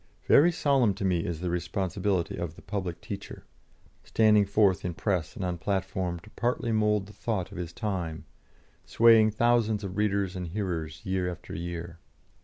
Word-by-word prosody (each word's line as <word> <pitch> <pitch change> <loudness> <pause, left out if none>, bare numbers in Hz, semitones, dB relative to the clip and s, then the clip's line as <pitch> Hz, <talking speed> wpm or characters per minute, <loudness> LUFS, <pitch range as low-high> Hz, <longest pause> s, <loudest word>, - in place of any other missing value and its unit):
Very 170 +5 +6
solemn 135 - +2
to 100 - -3
me 90 -2 +2
is 85 -2 -4
the 90 -1 -1
responsibility 95 +1 -1
of 85 -2 -5
the - - -15
public 95 -4 -4
teacher, 100 -1 -7 0.6
standing 105 -2 +4
forth 100 -3 +3
in 90 -2 -3
Press 90 -4 -1
and 95 - -3
on 90 -1 -3
platform 95 -1 -2
to 105 - -16
partly 120 -1 -1
mould 105 -2 +2
the 105 - -13
thought 105 -3 -3
of 95 - -7
his 85 -1 -4
time, 85 -5 -4 0.6
swaying 115 -2 +5
thousands 110 -1 +2
of 95 0 -5
readers 100 -3 0
and 90 -1 -4
hearers 80 -5 -4
year 95 -1 0
after 90 - -8
year. 85 0 -6
95 Hz, 170 wpm, -28 LUFS, 85-105 Hz, 0.6 s, Very